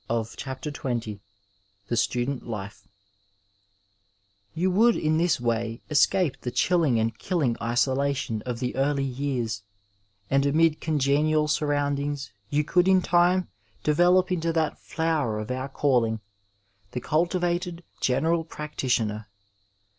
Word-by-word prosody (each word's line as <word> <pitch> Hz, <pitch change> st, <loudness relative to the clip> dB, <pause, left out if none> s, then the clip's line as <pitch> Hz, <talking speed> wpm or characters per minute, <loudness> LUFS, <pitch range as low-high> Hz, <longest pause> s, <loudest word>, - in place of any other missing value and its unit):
429 115 Hz, -1 st, -2 dB
Digitized 140 Hz, +2 st, -6 dB
by 130 Hz, -, -1 dB
Google 110 Hz, -4 st, -4 dB, 0.7 s
THE 120 Hz, -, 0 dB
STUDENT 125 Hz, +3 st, -1 dB
LIFE 100 Hz, -3 st, -7 dB, 1.7 s
Tou 185 Hz, +3 st, +2 dB
would, 225 Hz, +5 st, +4 dB
in 155 Hz, 0 st, +1 dB
this 175 Hz, -4 st, +2 dB
way, 115 Hz, -1 st, -2 dB
escape 150 Hz, +1 st, +2 dB
the 125 Hz, -, -3 dB
chilling 155 Hz, -4 st, +2 dB
and 110 Hz, 0 st, 0 dB
killing 150 Hz, -11 st, 0 dB
isolation 130 Hz, 0 st, 0 dB
of 125 Hz, +1 st, -4 dB
the 125 Hz, -1 st, -2 dB
early 140 Hz, +1 st, +1 dB
years, 125 Hz, -5 st, -2 dB, 0.7 s
and 135 Hz, +3 st, +2 dB
amid 155 Hz, +2 st, +3 dB
congenial 150 Hz, +1 st, +2 dB
suiroiindings 145 Hz, -1 st, -1 dB, 0.2 s
yon 150 Hz, +1 st, +1 dB
cotdd, 180 Hz, +4 st, +2 dB
in 190 Hz, -1 st, +4 dB
time, 175 Hz, +1 st, +3 dB, 0.3 s
develop 180 Hz, +4 st, +4 dB
into 170 Hz, -2 st, 0 dB
that 160 Hz, -2 st, -1 dB
flower 155 Hz, -9 st, -1 dB
of 110 Hz, +2 st, -5 dB
onr 130 Hz, +2 st, -3 dB
calling 120 Hz, -6 st, +1 dB, 0.4 s
— 100 Hz, 0 st, -40 dB
the 125 Hz, -, -2 dB
cultivated 175 Hz, +3 st, -1 dB, 0.2 s
general 165 Hz, +6 st, +1 dB
practitioner. 120 Hz, -9 st, -2 dB
140 Hz, 125 wpm, -26 LUFS, 120-165 Hz, 1.7 s, would